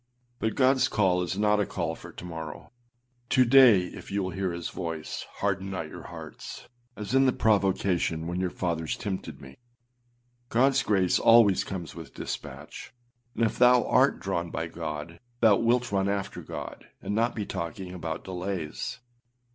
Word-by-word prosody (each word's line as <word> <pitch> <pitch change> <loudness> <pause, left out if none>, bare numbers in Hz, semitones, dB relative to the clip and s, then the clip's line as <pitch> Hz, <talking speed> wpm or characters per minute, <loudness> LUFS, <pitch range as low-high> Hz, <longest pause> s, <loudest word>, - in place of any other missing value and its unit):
But 110 - -1
Godâs 130 0 +4
call 95 -4 +2
is 90 +1 -2
not 105 0 +3
a 105 - +2
call - - -2
for - - -11
to - - -10
morrow. 80 0 -7 0.6
âTo 130 -1 +4
day 125 -6 +8
if 90 - -8
ye 100 - -2
will 95 -2 -1
hear 95 -1 -2
his 85 0 -4
voice, 80 -3 -5
harden 100 -1 0
not 85 -5 -4
your - - -10
hearts: - - -9 0.3
as 105 +2 -5
in 135 0 +5
the - - +5
provocation, 95 -7 +1
when 85 +2 -3
your 90 -1 0
fathers 85 -3 -2
tempted 95 -3 -5
me.â 65 0 -12 0.9
Godâs 135 +3 +3
grace 95 -4 +2
always 115 -4 +6
comes 90 -5 -6
with - - -10
dispatch; 110 - -7 0.4
and 115 - +2
if 110 - -2
thou 125 0 +6
art - - +3
drawn 85 0 -2
by 80 - -3
God, 80 0 -6 0.2
thou 110 -4 +6
wilt 120 +1 +1
run 100 0 +1
after 100 -1 -3
God, - - -8
and - - -4
not 115 +3 +1
be 105 -3 -3
talking 90 0 -5
about 80 -3 -5
delays. 90 0 -4
95 Hz, 170 wpm, -27 LUFS, 85-110 Hz, 0.9 s, day